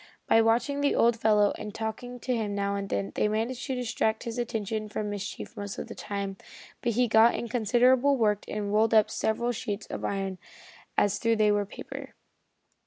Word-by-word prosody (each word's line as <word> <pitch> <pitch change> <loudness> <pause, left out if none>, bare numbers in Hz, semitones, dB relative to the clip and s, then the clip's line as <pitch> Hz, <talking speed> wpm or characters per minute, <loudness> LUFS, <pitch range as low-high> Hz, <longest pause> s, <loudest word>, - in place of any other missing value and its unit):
By 225 - +5
watching 235 +5 +1
the 285 - +2
old 235 0 +4
fellow 210 -2 +3
and 210 - -7
talking 245 +3 -5
to 255 - -1
him 210 -3 -2
now 200 0 0
and 200 0 -3
then 100 0 -2
they - - +1
managed 225 +4 -2
to 265 - -1
distract 230 -3 -1
his 235 0 -4
attention 215 -2 -3
from 210 0 -3
mischief 205 -1 -6
most 205 -1 -6
of - - -5
the - - -6
time, 200 -2 -4 0.4
but 235 - 0
he 245 +2 +2
got 225 +1 +5
in 235 - -3
considerable 250 +4 +3
work 210 -3 +2
and 205 -1 -3
rolled 220 +1 +3
up 215 -1 +5
several 235 +2 0
sheets 215 -3 -4
of - - -5
iron 195 -2 -2 0.6
as 205 0 +2
though 230 0 +2
they 215 -1 +3
were 205 -1 +1
paper. - - -9
220 Hz, 195 wpm, -28 LUFS, 205-235 Hz, 0.6 s, By